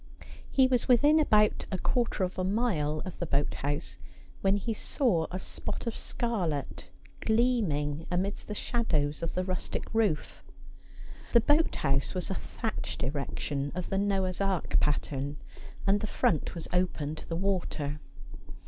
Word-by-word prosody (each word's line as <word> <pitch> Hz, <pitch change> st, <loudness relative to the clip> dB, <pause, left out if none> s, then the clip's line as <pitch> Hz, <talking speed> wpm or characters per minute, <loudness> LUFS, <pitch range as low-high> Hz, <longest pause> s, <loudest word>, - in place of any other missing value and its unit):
He 265 Hz, -, +5 dB
was 255 Hz, -2 st, +2 dB
within 290 Hz, +6 st, +6 dB
about 210 Hz, -8 st, +3 dB
a 190 Hz, -, 0 dB
quarter 235 Hz, -1 st, 0 dB
of 185 Hz, +1 st, -2 dB
a -, -, +1 dB
mile 185 Hz, -8 st, 0 dB
of 185 Hz, -, -7 dB
the 175 Hz, -, -2 dB
boat 140 Hz, 0 st, +1 dB
house 145 Hz, +3 st, -3 dB, 0.4 s
when 195 Hz, +1 st, +3 dB
he 225 Hz, +3 st, -2 dB
saw 210 Hz, -, +1 dB
a 185 Hz, -, -3 dB
spot 190 Hz, -, -5 dB
of 230 Hz, -, -2 dB
scarlet 180 Hz, -, -2 dB, 0.3 s
gleaming 185 Hz, -, +1 dB
amidst 190 Hz, +3 st, -2 dB
the 210 Hz, -, -4 dB
shadows 155 Hz, -, 0 dB
of 165 Hz, -, -2 dB
the 185 Hz, -, +1 dB
rustic 185 Hz, +3 st, -3 dB
roof. 210 Hz, -9 st, 0 dB, 0.9 s
The 235 Hz, -, +7 dB
boat 300 Hz, +6 st, +3 dB
house 140 Hz, +4 st, +1 dB
was 185 Hz, +1 st, -2 dB
a -, -, +2 dB
thatched 220 Hz, +3 st, -4 dB
erection 140 Hz, +1 st, -2 dB
of 180 Hz, -1 st, -4 dB
the 195 Hz, -, +2 dB
Noah's 195 Hz, -2 st, 0 dB
Ark 195 Hz, -3 st, +1 dB
pattern, 145 Hz, -1 st, -1 dB, 0.5 s
and 200 Hz, +1 st, +4 dB
the 215 Hz, -, -3 dB
front 160 Hz, -4 st, +1 dB
was 165 Hz, -, -4 dB
open 175 Hz, -5 st, 0 dB
to 155 Hz, -, -9 dB
the 165 Hz, -, -1 dB
water. 170 Hz, -6 st, -1 dB
185 Hz, 155 wpm, -30 LUFS, 150-220 Hz, 0.9 s, The